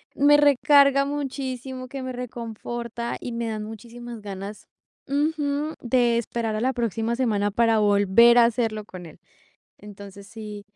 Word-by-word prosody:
me 290 +1 +5
recarga 280 -1 +5
muchísimo, 265 -2 -5
que 270 0 -6
me 255 - -4
reconforta 235 -1 -6
y 245 - -5
me 235 0 -3
dan 215 -1 -4
muchísimas 235 +2 -9
ganas 200 +1 -8 0.4
ujú, 295 +1 -1
de 240 -1 +2
esperar 230 -1 -3
a 215 - -2
la 260 +2 +1
próxima 230 -1 -1
semana 210 -5 0
para 225 0 +2
volver 205 +3 +5
a 235 - +7
hacerlo 225 -2 -1
con 185 -3 -10
él. 155 - -15 0.6
Entonces, 200 -1 -12
sí, 210 -2 -8
235 Hz, 145 wpm, -24 LUFS, 215-260 Hz, 0.6 s, a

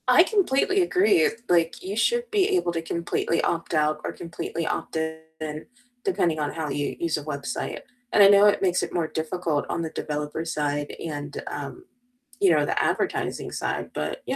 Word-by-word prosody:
I - - +8
completely 385 -2 +2
agree, 355 - +4 0.2
like, 170 -2 +2
you 190 +2 -4
should 475 - +1
be 405 -2 +3
able 265 - 0
to 165 - -1
completely 170 0 -1
opt 165 0 -1
out 155 -1 +2
or - - -2
completely 165 0 -5
opt - - -3
in, 160 -1 -5 0.4
depending 170 - +1
on 145 -1 -1
how 160 -2 -4
you 145 +1 -2
use 170 -2 0
a 150 - -6
website. 140 -2 -4 0.3
And 205 - +7
I - - +10
know 200 0 +7
it 205 - +4
makes 180 -2 +2
it - - -4
more 170 -2 0
difficult 160 -1 -1
on 170 - -1
the 160 - -3
developer 150 +1 -3
side 145 -3 -2
and, 145 -2 -5
um, 365 +1 -6 0.6
you 195 - +6
know, 150 -2 +4
the - - 0
advertising - - -1
side, - - -3
but, 75 - -3
you - - -1
165 Hz, 185 wpm, -25 LUFS, 150-195 Hz, 0.6 s, I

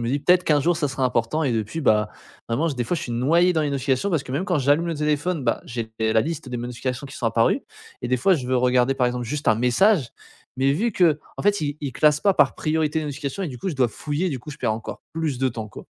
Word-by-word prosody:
me 115 - -2
dis: 140 +4 +1
«Peut 180 - +4
être 180 0 +3
qu'1 150 -2 +3
jour 170 +2 +2
ça 145 -3 0
sera 135 -1 -2
important» 125 +5 0
et 130 - +1
depuis 110 +8 -2
bah 105 -6 +3 0.4
vraiment 150 +9 0
des 125 -5 -2
fois 175 - -1
je - - -4
suis 120 - -5
noyé 165 +9 +3
dans 160 - +2
les 145 - -1
notifications. 135 +6 0
Parce 160 -5 +1
que 130 - -8
même 165 +7 -1
quand 180 -5 0
j'allume 145 +5 +2
le 165 - -1
téléphone, 150 +2 -1
bah - - 0
j'ai 115 -2 -5
la 110 0 +3
liste 155 0 -4
des 125 - -3
notifications 125 +2 -4
qui 135 - -10
sont 120 - -6
apparues 115 0 +2 0.4
et - - -3
des 125 - +2
fois 190 +7 +4
je 130 -6 -3
veux 130 0 +1
regarder 125 +1 +3
par 125 -2 +1
exemple 125 0 -2
juste 150 +5 -2
un - - +5
message, 125 - +3 0.5
mais 135 +1 +3
vu 215 +9 0
qu'en 165 -5 0
fait, 205 -2 +2
il 145 0 -2
il 140 -4 -4
classe 150 -1 +3
pas 200 -2 +3
par - - +3
priorité 155 0 0
de 155 - -3
notification 145 +5 -4
et 175 - -2
du 125 - -7
coup, 190 +9 -3
je - - -5
dois 125 -3 +2
fouiller 150 - -2
du 135 -6 -3
coup 150 - -10
je 150 - -10
perds 110 - 0
encore 110 - -7
plus 155 -6 -2
de 130 0 +2
temps 110 -3 -6
quoi. - - -11
140 Hz, 280 wpm, -23 LUFS, 125-160 Hz, 0.5 s, un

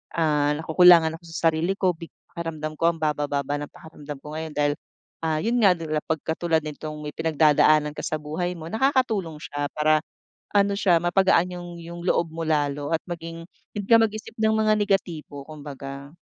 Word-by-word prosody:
ah, 150 -3 +2
nakukulangan 165 0 +6
ako 170 - -32
sa 165 0 +3
sarili 165 +5 0
ko 185 -2 +2
big 165 0 -10 0.2
pakiramdam 155 -2 -4
ko 165 +1 +3
ang 165 - -12
babababa 145 -2 -1
ng 145 - -7
pakiramdam 150 -2 -10
ko 150 +1 -8
ngayon 160 -1 -5
dahil, 145 0 +2 0.5
ah, 155 -1 +1
yun 235 +3 0
nga 185 - +7 0.3
pagkatulad 160 +1 0
nitong 155 0 -6
may 150 - -4
pinagdadaanan 155 -1 +4
ka - - -5
sa 155 - -1
buhay 175 +4 -3
mo, 160 0 -8
nakakatulong 220 - +1
siya 145 -1 -4
para, 155 0 +3 0.5
ano 200 0 +4
siya 180 -5 +4
mapagaan 180 0 +3
yung 175 - -8
yung 170 +1 -8
loob 170 -3 +1
mo 165 - -7
lalo 145 -2 0
at 165 - +1
maging 165 -1 -6 0.3
hindi 205 - -2
ka 230 - +8
mag-isip 215 -1 -1
ng 220 0 +3
mga 215 0 +3
negatibo 170 -8 -2
kumbaga. 140 -2 -8
160 Hz, 175 wpm, -24 LUFS, 150-175 Hz, 0.5 s, ka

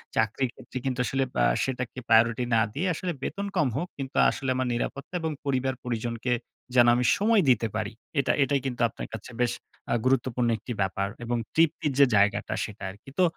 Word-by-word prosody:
চাকরির 110 +4 +1
ক্ষেত্রে - - -9
কিন্তু 125 -1 -1
আসলে 135 0 0
বা - - +3
অ্যা - - +1
সেটাকে 125 -1 -3
প্রায়োরিটি 115 +2 +4
না 110 - +5
দিয়ে 180 +6 -1
আসলে 175 +3 -3
বেতন 200 +1 -3
কম 155 -6 +3
হোক। 175 - -2
কিন্তু 135 -1 -6
আসলে 135 -2 -3
আমার 130 -1 0
নিরাপত্তা 140 +6 -4
এবং 160 -1 -1
পরিবার-পরিজনকে 125 -3 -1 0.4
যেন 120 -1 +7
আমি 125 0 +1
সময় 215 0 +4
দিতে 115 -2 +3
পারি। 110 -2 -2 0.3
এটা 140 - +2
এটাই 140 -1 +1
কিন্তু 125 -2 -3
আপনার - - -7
কাছে 110 +3 -7
বেশ 120 -1 +2 0.4
আ - - +3
গুরুত্বপূর্ণ 125 -2 +2
একটি 120 +3 -6
ব্যাপার। 100 +1 0 0.2
এবং 120 0 0 0.2
তৃপ্তির 160 -2 +2
যে 140 - +9
জায়গাটা, 100 +1 +2
সেটা 105 -2 -7
আরকি। 105 +7 -12
তো 185 - +6
125 Hz, 190 wpm, -27 LUFS, 115-140 Hz, 0.4 s, যে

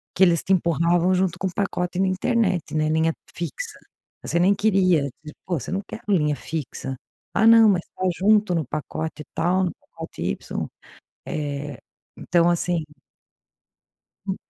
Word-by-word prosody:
que 190 - +5
eles 170 -2 +4
te 195 - +2
empurravam 170 +1 +2
junto 185 -1 0
com 190 - 0
pacote 180 -1 -2
na 195 - +3
internet, 185 -4 0
né, 155 0 +2
linha 160 +1 +2 0.2
fixa, 460 - -5 0.4
você 170 - -1
nem 190 +3 +5
queria, 190 -6 +3 0.2
tipo, 150 - -10
você 175 -5 -2
não 195 +1 -1
quer 220 - -8
linha 150 -7 +2
fixa, 135 -2 -5 0.4
"ah 220 +2 +4
não, 225 -1 +8
mas 180 -3 +2
está 185 - -9 0.2
junto 210 -1 +4
no 160 - +1
pacote 155 +1 -4
tal, 180 +3 +2
no 175 - -1 0.2
pacote - - -9
Y". - - -3 0.6
Eh, 145 -1 -4 0.4
então, 175 -1 +2
assim 175 -1 0 1.4
Hum, 190 - -1
175 Hz, 150 wpm, -23 LUFS, 160-190 Hz, 1.4 s, não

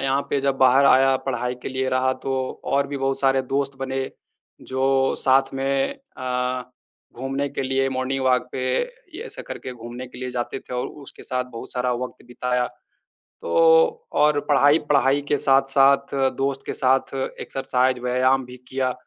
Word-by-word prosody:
यहाँ 135 +1 +1
पे 140 - +2
जब 135 0 0
बाहर 130 +1 +5
आया 135 0 +5
पढ़ाई 125 -1 -1
के - - -4
लिए 130 0 -2
रहा 130 0 +2
तो - - -3 0.3
और 140 0 +1
भी 145 - -5
बहुत 135 0 -1
सारे 135 -1 +3
दोस्त 140 -1 -1
बने 135 0 -3 0.6
जो 135 0 +2
साथ 135 0 +3
में 135 - 0 0.2
अ, 125 0 -2 0.5
घूमने 135 +3 -2
के 140 - -4
लिए 135 0 +1
मॉर्निंग 130 +1 -2
वॉक 125 -1 +2
पे 130 - -3 0.5
ये 385 - -6
ऐसे - - -8
करके 130 - -7
घूमने 120 +1 -8
के 125 - -12
लिए 130 0 -4
जाते 125 +1 -3
थे - - -8
और 125 - -1
उसके 140 -2 -13
साथ 125 0 -2
बहुत 115 - -8
सारा 125 0 0
वक़्त 125 +1 -5
बिताया। 125 0 -1 0.7
तो - - -6 0.7
और 150 0 +4
पढ़ाई 145 +1 +5
पढ़ाई 140 0 +4
के 145 - +3
साथ-साथ 135 +1 +3 0.2
दोस्त 135 0 -1
के - - -2
साथ 130 +1 +1 0.3
एक्सरसाइज़ 130 -1 0
व्यायाम 130 +2 +2
भी 125 0 -11
किया। 130 -1 0
135 Hz, 170 wpm, -23 LUFS, 125-135 Hz, 0.7 s, बाहर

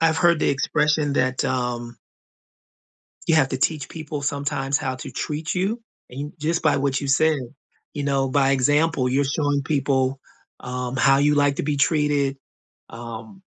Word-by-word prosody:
I've 160 0 +3
heard 170 -2 +4
the - - +2
expression 150 +1 +1
that, 130 -1 +1
um 120 -2 -2 1.3
"You 165 - +4
have 135 -4 +3
to 130 - -2
teach 145 0 0
people 155 -2 -6
sometimes 140 -1 -1
how 130 -3 -3
to - - -8
treat 155 +1 -3
you," 205 +6 -1 0.3
and, 140 +4 -6
just 165 +3 0
by - - +3
what 135 -1 0
you 140 - -3
said, 150 +2 +3 0.5
you 145 - -4
know, 135 -1 +1
by 135 0 +3
example, 145 +1 +2
you're 140 +2 +2
showing 145 0 0
people, 135 -2 0 0.4
um, 125 0 -4
how 135 +1 +5
you 145 +1 +3
like 145 -1 +3
to - - -1
be 145 -1 -1
treated, 145 -2 +1 0.5
um, 115 - -9
140 Hz, 165 wpm, -23 LUFS, 130-150 Hz, 1.3 s, how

